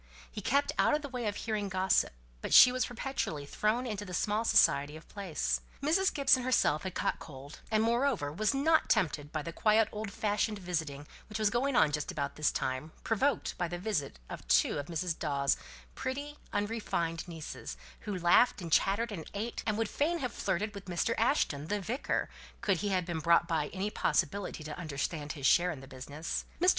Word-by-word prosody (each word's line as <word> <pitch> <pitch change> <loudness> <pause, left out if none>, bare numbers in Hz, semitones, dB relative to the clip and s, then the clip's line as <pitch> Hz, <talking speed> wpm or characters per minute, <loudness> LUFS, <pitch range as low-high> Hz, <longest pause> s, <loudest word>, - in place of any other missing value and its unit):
He - - -6
kept 280 +3 +2
out - - +4
of 300 - -3
the 285 - -5
way 250 -4 -3
of 205 - -1
hearing 210 -3 -2
gossip; 190 0 +2 0.3
but - - +1
she 250 - +10
was 255 0 0
perpetually 245 - -3
thrown 215 - 0
into 210 -4 -3
the 180 -3 -6
small 210 +5 +1
society 145 -9 +4
of 160 - -15
the - - -20
place. 150 - -1 0.2
Mrs. 355 +7 +2
Gibson 275 -2 +4
herself 245 -12 +2
had 190 -2 -5
caught - - -1
cold, 140 0 -10
and 220 -1 +2
moreover 235 - +1
was 215 +6 +1
not 310 +4 +3
tempted 155 -8 +1
by 155 -2 -3
the 170 - -6
quiet 215 +2 +3
old 215 0 -4
fashioned 210 +2 0
visiting 160 -6 -3 0.2
which 215 - -4
was 215 -2 +2
going 255 +3 +1
on 160 -11 +5
just 150 +3 -2
about 140 -5 -3
this 150 -1 +2
time, 130 +5 -3
provoked 240 +2 0
by 175 - +1
the 175 +1 -4
visit 180 - -2
of - - -8
two - - +3
of 145 - -5
Mrs. 170 0 -2
Dawes' 140 -3 +1 0.4
pretty 285 +3 -5
unrefined 205 -6 -2
nieces, 165 -3 -7 0.2
who 205 -4 -4
laughed, 180 +8 +4
and 170 -3 -6
chattered, 205 +8 +2
and 165 -6 -6
ate, 225 +4 -3
and 215 -1 +1
would 225 -1 0
fain 320 +10 0
have 255 -7 -3
flirted 205 +4 -1
with 200 -1 -9
Mr. 180 +5 0
Ashton, 155 - +1
the 210 +4 -1
vicar, 235 +8 -1 0.3
could 200 -5 +2
he 205 +5 -2
have 185 -3 +1
been 170 -2 -3
brought 170 +1 +4
by 160 -4 0
any 195 +5 -3
possibility 180 -2 0
to 155 +2 -7
understand 150 -1 -3
his 140 -3 -6
share 175 +5 +5
in 160 -6 -4
the 135 - -11
business. 140 +5 -5
Mr. 360 +2 +5
195 Hz, 200 wpm, -31 LUFS, 155-230 Hz, 0.4 s, she